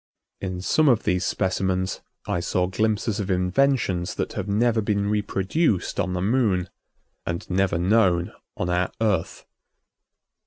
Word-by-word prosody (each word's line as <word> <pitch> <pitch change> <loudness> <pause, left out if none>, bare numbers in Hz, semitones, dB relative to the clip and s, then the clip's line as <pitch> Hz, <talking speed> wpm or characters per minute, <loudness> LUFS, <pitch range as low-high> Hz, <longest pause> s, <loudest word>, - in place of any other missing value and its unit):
In 90 -2 -4
some 155 +10 +3
of 120 -3 +3
these 90 -2 0
specimens 95 0 -1 0.2
I 90 - -1
saw 90 +1 0
glimpses 110 +3 0
of 100 -1 -3
inventions 90 0 +1
that - - -3
have 95 - -4
never 110 +2 +2
been 100 -1 0
reproduced 105 - 0
on 90 - 0
the 90 0 -2
Moon 100 -5 +1 0.5
and 85 +3 -4
never 95 -2 +1
known 90 -2 +2 0.2
on 90 - -1
our 90 +1 0
Earth. 105 -7 -1
95 Hz, 140 wpm, -24 LUFS, 90-110 Hz, 0.5 s, some